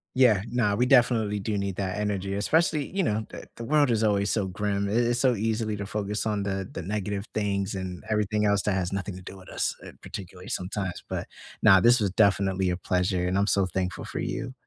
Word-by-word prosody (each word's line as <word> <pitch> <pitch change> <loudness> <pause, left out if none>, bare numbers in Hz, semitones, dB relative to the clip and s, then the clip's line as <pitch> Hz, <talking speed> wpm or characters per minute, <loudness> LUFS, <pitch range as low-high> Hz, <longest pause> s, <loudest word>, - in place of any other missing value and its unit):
Yeah. 120 -7 +5
Now, 115 -4 +1
we 125 - +2
definitely 115 -5 +3
do 105 +1 -2
need 100 -2 -2
that 95 0 -2
energy, 100 -2 -2
especially, 155 +6 +1
you 195 - +2
know, 110 -4 0
the - - -9
the 115 - -7
world 145 0 +3
is 110 -1 +1
always 100 -1 +2
so 100 -4 0
grim. 100 +1 -1
I - - -2
it's 120 +1 +2
so 125 -2 +3
easily 110 0 -1
to 100 - -4
focus 105 +1 -3
on 105 -2 0
the 95 -1 -2
the - - -5
negative 100 +2 -3
things 100 -1 -1
and 95 -2 -5
everything 105 0 +1
else 100 -1 +3
that 105 - +1
has 90 -1 -1
nothing 100 -1 -3
to 90 - -9
do 95 +1 -10
with 95 - -14
us, - - -1
uh, - - -9
particularly 95 +2 -8
sometimes, 95 -3 -3
but - - -4 0.3
now 95 -3 +7
this 120 +4 +5
was 100 -2 +1
definitely 95 -2 +2
a 90 - -1
pleasure, 90 -1 0
and 95 +2 0
I'm 100 +1 +2
so 100 -2 +3
thankful 90 +1 -3
for - - -5
you. 130 -1 -3
100 Hz, 225 wpm, -27 LUFS, 95-110 Hz, 0.3 s, now